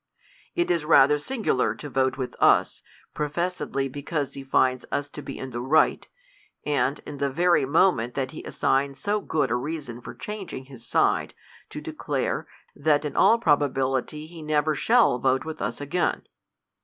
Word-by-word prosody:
It 345 Hz, -, +1 dB
is 170 Hz, -3 st, +1 dB
rather 150 Hz, -1 st, +5 dB
singular 145 Hz, -, 0 dB
to 145 Hz, -, -8 dB
vote 130 Hz, -1 st, +1 dB
witl^us, 130 Hz, -2 st, +2 dB, 0.3 s
professedly 150 Hz, -2 st, -2 dB
be 145 Hz, +2 st, -7 dB
cause 145 Hz, -2 st, -2 dB
he 140 Hz, -, -7 dB
finds 130 Hz, -1 st, +2 dB
us 145 Hz, 0 st, -2 dB
to -, -, -8 dB
be 145 Hz, -, -7 dB
in 130 Hz, -, -6 dB
the 120 Hz, 0 st, -4 dB
right, 145 Hz, +6 st, +2 dB, 0.6 s
and, 145 Hz, -1 st, +1 dB
in 145 Hz, -2 st, -8 dB
the 140 Hz, 0 st, +1 dB
very 170 Hz, +1 st, +3 dB
moment 135 Hz, -5 st, +2 dB
that 135 Hz, -1 st, -2 dB
he -, -, -9 dB
assigns 140 Hz, 0 st, 0 dB
so 210 Hz, 0 st, 0 dB
good 145 Hz, -, 0 dB
a -, -, +2 dB
reason 135 Hz, -2 st, -5 dB
for 120 Hz, +1 st, -9 dB
changing 195 Hz, -, -7 dB
his 130 Hz, -3 st, -12 dB
side, -, -, +1 dB, 0.3 s
to -, -, -7 dB
declare, -, -, -3 dB, 0.3 s
that 145 Hz, 0 st, +2 dB
in 150 Hz, -, -4 dB
all 230 Hz, -, +5 dB
probability 145 Hz, -, 0 dB
he 165 Hz, 0 st, -11 dB
never 155 Hz, 0 st, +1 dB
shall 225 Hz, -, +3 dB
vote 130 Hz, +1 st, +1 dB
with 160 Hz, -1 st, -6 dB
us -, -, -3 dB
again. 170 Hz, +5 st, -1 dB
145 Hz, 170 wpm, -25 LUFS, 130-160 Hz, 0.6 s, rather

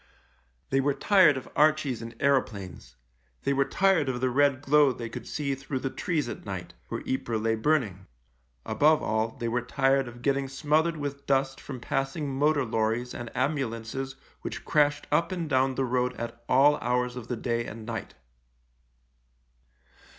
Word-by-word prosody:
They 135 Hz, -, +3 dB
were 140 Hz, 0 st, +1 dB
tired 190 Hz, -9 st, +5 dB
of 130 Hz, -, -7 dB
Archies 150 Hz, -5 st, +2 dB
and 115 Hz, 0 st, -8 dB
aeroplanes: 100 Hz, -, -1 dB, 0.5 s
they 140 Hz, -, +1 dB
were 135 Hz, 0 st, +2 dB
tired 185 Hz, -6 st, +2 dB
of 125 Hz, -1 st, -2 dB
the 130 Hz, 0 st, +1 dB
red 140 Hz, 0 st, +3 dB
glow 145 Hz, 0 st, +5 dB
they 115 Hz, -2 st, -6 dB
could -, -, -8 dB
see 145 Hz, -2 st, -2 dB
through 135 Hz, +1 st, -4 dB
the 130 Hz, 0 st, -3 dB
trees 165 Hz, -8 st, -1 dB
at -, -, -6 dB
night 90 Hz, -3 st, -6 dB
— -, -, -37 dB
where -, -, -4 dB
Ypres 120 Hz, -4 st, -1 dB
lay 110 Hz, +1 st, +1 dB
burning; 110 Hz, -, 0 dB, 0.6 s
above 155 Hz, +1 st, +3 dB
all, 110 Hz, +1 st, -1 dB
they 115 Hz, -, -3 dB
were 120 Hz, +1 st, 0 dB
tired 135 Hz, +2 st, +1 dB
of 120 Hz, 0 st, -11 dB
getting 140 Hz, -1 st, +1 dB
smothered 155 Hz, +4 st, +1 dB
with 145 Hz, -1 st, -5 dB
dust 135 Hz, -1 st, +1 dB
from 130 Hz, -3 st, -7 dB
passing 135 Hz, +3 st, -2 dB
motor 145 Hz, 0 st, +2 dB
lorries 115 Hz, +2 st, -1 dB
and 120 Hz, -1 st, -6 dB
ambulances 130 Hz, -1 st, -2 dB, 0.3 s
which -, -, -6 dB
crashed 145 Hz, -1 st, +2 dB
up 170 Hz, +1 st, +2 dB
and 175 Hz, -3 st, -3 dB
down 130 Hz, -2 st, +2 dB
the 135 Hz, -, 0 dB
road 125 Hz, 0 st, 0 dB
at 120 Hz, 0 st, -6 dB
all 140 Hz, +3 st, +5 dB
hours 125 Hz, 0 st, -1 dB
of 120 Hz, -2 st, -7 dB
the 125 Hz, -, -3 dB
day 115 Hz, 0 st, -1 dB
and 110 Hz, -1 st, -8 dB
night. 115 Hz, 0 st, -5 dB
135 Hz, 170 wpm, -28 LUFS, 120-145 Hz, 0.6 s, tired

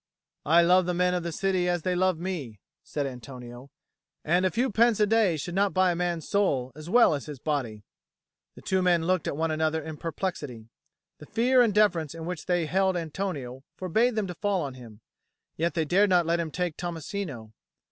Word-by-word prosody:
"I 170 Hz, +3 st, +6 dB
love 180 Hz, +1 st, +4 dB
the 180 Hz, -, 0 dB
men 180 Hz, 0 st, +2 dB
of 180 Hz, -, 0 dB
the 170 Hz, 0 st, -4 dB
city 185 Hz, 0 st, 0 dB
as 175 Hz, -2 st, -1 dB
they 185 Hz, -, 0 dB
love 185 Hz, -1 st, +1 dB
me," 160 Hz, -, -5 dB, 0.2 s
said 145 Hz, -2 st, -3 dB
Antonio. 125 Hz, 0 st, -9 dB, 0.6 s
"And 180 Hz, +3 st, +3 dB
a -, -, 0 dB
few 245 Hz, +5 st, 0 dB
pence 230 Hz, +1 st, +3 dB
a 210 Hz, -, +5 dB
day 210 Hz, -6 st, +2 dB
should 175 Hz, +4 st, -5 dB
not 195 Hz, +1 st, +1 dB
buy 185 Hz, -1 st, +4 dB
a -, -, -2 dB
man's 175 Hz, -2 st, -2 dB
soul 140 Hz, -11 st, +1 dB
as 155 Hz, +4 st, -10 dB
well 235 Hz, -3 st, +5 dB
as 145 Hz, 0 st, -4 dB
his 150 Hz, -2 st, -7 dB
body." 125 Hz, -7 st, -3 dB, 0.7 s
The -, -, -14 dB
two 190 Hz, -1 st, +1 dB
men 175 Hz, -2 st, +2 dB
looked 185 Hz, +1 st, +1 dB
at -, -, -3 dB
one 160 Hz, 0 st, 0 dB
another 160 Hz, 0 st, 0 dB
in 155 Hz, 0 st, -7 dB
perplexity. 150 Hz, -, -5 dB, 0.5 s
The 150 Hz, -, -12 dB
fear 250 Hz, +2 st, +3 dB
and 235 Hz, -3 st, +4 dB
deference 175 Hz, -7 st, +2 dB
in 165 Hz, -1 st, -7 dB
which 180 Hz, -1 st, -5 dB
they 175 Hz, -2 st, +1 dB
held 190 Hz, +3 st, +1 dB
Antonio 155 Hz, -7 st, -4 dB, 0.2 s
forbade 220 Hz, +7 st, +1 dB
them 215 Hz, -2 st, 0 dB
to 180 Hz, -, -5 dB
fall 195 Hz, 0 st, -1 dB
on 140 Hz, -2 st, -5 dB
him; 115 Hz, -4 st, -13 dB, 0.5 s
yet 170 Hz, +2 st, -1 dB
they 160 Hz, -2 st, +1 dB
dared 195 Hz, +6 st, +3 dB
not 175 Hz, -2 st, +4 dB
let 170 Hz, +1 st, +1 dB
him 165 Hz, -1 st, -2 dB
take 175 Hz, 0 st, -3 dB
Tommasino. 165 Hz, -, -5 dB
175 Hz, 210 wpm, -27 LUFS, 150-190 Hz, 0.7 s, I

